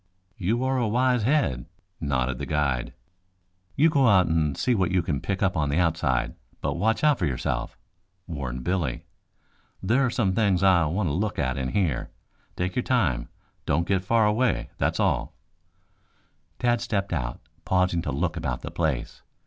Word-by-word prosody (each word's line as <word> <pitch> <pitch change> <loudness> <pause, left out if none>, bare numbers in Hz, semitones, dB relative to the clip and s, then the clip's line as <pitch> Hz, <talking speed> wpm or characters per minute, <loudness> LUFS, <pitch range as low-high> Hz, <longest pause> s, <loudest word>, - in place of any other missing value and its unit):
"You 110 +7 0
are 130 0 +1
a 120 - +1
wise 125 +2 +2
head," 110 - +1 0.3
nodded 65 -3 -1
the - - -4
guide. 70 -6 0 0.8
"You 155 +3 +4
go 140 -4 +4
out 95 -4 +5
and 80 -4 0
see 125 - +1
what 95 -5 +1
you 90 -2 +1
can 70 -5 -2
pick 95 0 -2
up 95 -1 +1
on 75 -2 0
the 70 - 0
outside, 75 -8 +1 0.3
but - - -1
watch 110 +5 0
out 150 -3 +4
for 85 - +1
yourself," 65 -2 -3 0.5
warned 65 -7 -5
Billy. 90 -1 -1 0.7
"There 120 +8 +2
are 130 - +2
some 105 -5 0
things 100 -3 +2
I 90 -4 +5
want 90 +5 -1
to - - -1
look 100 +4 -1
at 65 -2 0
in 65 -1 -2
here. 90 -11 0 0.5
Take 90 +1 -2
your 125 - +1
time. 105 - 0 0.4
Don't 85 +2 +1
get 95 -2 +1
far 115 +3 +3
away, 115 +4 +1
that's - - 0
all." - - 0 1.2
Tad 120 -2 +1
stepped 100 -3 -2
out, - - -3 0.2
pausing 90 -2 +1
to 70 - -3
look 80 +5 -1
about - - -3
the - - -5
place. 80 -7 -2
90 Hz, 175 wpm, -26 LUFS, 75-110 Hz, 1.2 s, out